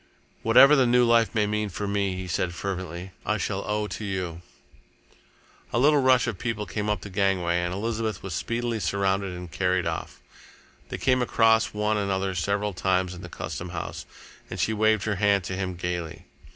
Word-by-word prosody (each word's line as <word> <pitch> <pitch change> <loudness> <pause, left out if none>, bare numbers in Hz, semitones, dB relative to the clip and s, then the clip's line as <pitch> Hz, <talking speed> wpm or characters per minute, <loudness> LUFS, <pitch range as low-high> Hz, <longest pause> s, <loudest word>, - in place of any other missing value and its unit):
"Whatever 135 +6 +7
the 130 -3 +4
new 125 0 +4
life 115 -3 +3
may 105 -1 +3
mean 105 0 -1
for 100 +2 -4
me," 100 -2 0
he 95 0 -5
said 90 0 -1
fervently, 95 -1 -5
"I 110 - 0
shall 100 -1 -2
owe 105 0 0
to 105 - -6
you." 90 -4 -3 1.3
A - - 0
little 145 +3 +5
rush 130 -2 +4
of 115 -7 -4
people 115 -3 -2
came 105 +4 -3
up 105 -4 0
the 100 - -8
gangway, 90 -3 +1
and 90 0 -2
Elizabeth 110 +1 -3
was 95 -2 -5
speedily 115 +7 -2
surrounded 100 +1 0
and 90 -1 -8
carried 90 -1 0
off. - - -4 0.7
They - - -4
came 130 -1 +2
across 115 -2 +3
one 105 0 +1
another 95 -1 -1
several 100 +3 -1
times 90 0 0
in 90 - -9
the 90 - -9
Custom 90 +1 -6
House, 85 -2 -6 0.4
and - - -6
she 110 - +1
waved 110 -1 +2
her 105 -3 -1
hand 100 -1 +3
to 95 - -4
him 95 -1 -3
gaily. 85 -2 -4
100 Hz, 190 wpm, -26 LUFS, 90-110 Hz, 1.3 s, Whatever